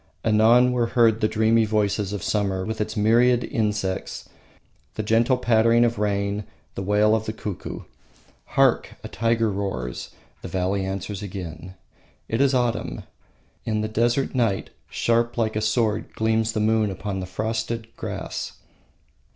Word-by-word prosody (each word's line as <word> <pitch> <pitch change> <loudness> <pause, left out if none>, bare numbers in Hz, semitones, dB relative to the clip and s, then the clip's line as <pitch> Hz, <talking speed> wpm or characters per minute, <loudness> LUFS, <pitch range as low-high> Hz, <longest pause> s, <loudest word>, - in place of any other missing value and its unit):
Anon 115 +3 +5
were 120 -2 +1
heard 115 -2 +4
the 110 - +3
dreamy 110 +1 +3
voices 105 -2 0
of 105 -3 -4
summer 95 -3 0
with 110 +1 -3
its 110 +1 -3
myriad 120 +3 +4
insects, 105 -4 -2 0.7
the 110 - -2
gentle 115 +4 +3
pattering 115 -1 +4
of 115 -3 -1
rain, 100 0 -1 0.3
the - - -5
wail 105 +2 +3
of 110 0 -3
the - - 0
cuckoo. 105 -4 -6 0.8
Hark! - - +3
a - - -5
tiger 115 -1 +1
roars, 95 -12 -4 0.3
the - - -6
valley 95 +1 -1
answers 95 +1 -4
again. 90 -3 -7 0.5
It 115 +3 0
is 140 -1 +3
autumn; 120 -2 -1 0.6
in 110 -1 -1
the 110 - -1
desert 120 +4 +1
night, 115 -7 0 0.2
sharp 115 0 +1
like 110 -2 0
a 110 - 0
sword 110 -1 0
gleams 110 0 +1
the - - -1
moon 110 0 +2
upon 95 0 -4
the 95 - -5
frosted 110 +3 -3
grass. - - -5
110 Hz, 150 wpm, -24 LUFS, 100-115 Hz, 0.8 s, Anon